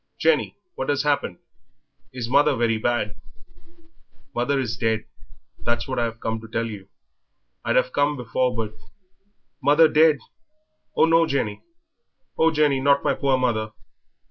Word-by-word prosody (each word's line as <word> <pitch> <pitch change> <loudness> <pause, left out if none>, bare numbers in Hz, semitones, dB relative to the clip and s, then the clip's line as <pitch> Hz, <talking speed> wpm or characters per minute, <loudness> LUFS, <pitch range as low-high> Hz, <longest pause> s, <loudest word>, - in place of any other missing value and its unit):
"Jenny, 485 - +1 0.2
what - - -4
has 145 -1 +1
happened; 145 -11 0 0.7
is 125 -3 -5
mother 145 +3 +4
very 115 -2 +1
bad?" 115 -2 -1 1.2
"Mother 135 +3 0
is 115 -4 -2
dead, 110 -2 -1 0.5
that's 120 0 -2
what 130 -2 -2
I've 115 -1 -2
come 115 -1 -3
to 115 - -10
tell 115 +1 -2
you; 105 -4 -8 0.8
I'd - - 0
have - - +2
come 145 +1 +1
before, 125 +1 -1
but 110 -2 -3 0.5
" 200 -4 -47
"Mother 150 +4 +6
dead! 155 -1 +4 0.8
Oh, - - +6
no, 165 0 +4
Jenny! 115 -8 -2 0.7
Oh, 160 - +4
Jenny, 150 -3 +2
not 140 +1 +3
my - - +2
poor 135 -2 +1
mother!" 110 -4 -1
130 Hz, 145 wpm, -23 LUFS, 115-145 Hz, 1.2 s, Mother